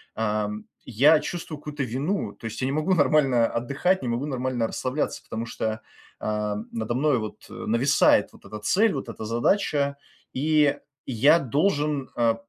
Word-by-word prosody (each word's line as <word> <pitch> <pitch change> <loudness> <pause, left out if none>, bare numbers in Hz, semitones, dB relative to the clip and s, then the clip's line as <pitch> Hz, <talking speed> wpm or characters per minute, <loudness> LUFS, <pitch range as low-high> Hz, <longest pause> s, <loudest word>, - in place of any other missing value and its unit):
ам, 105 -1 -2 0.2
я 140 +7 +5
чувствую 165 -3 -5
какую-то 150 -1 -4
вину. 135 - -2
То - - -14
есть 115 +2 -5
я - - +1
не 135 - -1
могу 155 +5 +1
нормально 135 -6 +3
отдыхать, 140 +12 0
не 125 - -3
могу 120 +4 -1
нормально 130 -4 -1
расслабляться, 130 +6 -3
потому 115 +1 -5
что, 110 -1 -3 0.4
ам, 105 0 -2
надо 115 +1 -2
мною, 140 -1 +2
вот, 110 - -8
э, - - -11
нависает 125 +6 +2
вот - - -18
эта 105 - -7
цель, 205 - +2
вот 135 -4 -4
эта 110 - -7
задача, 140 - +1 0.4
и 150 +1 +2 0.3
я 135 +7 +4
должен, 145 - 0
э, 115 -1 +3
130 Hz, 165 wpm, -25 LUFS, 115-150 Hz, 0.4 s, я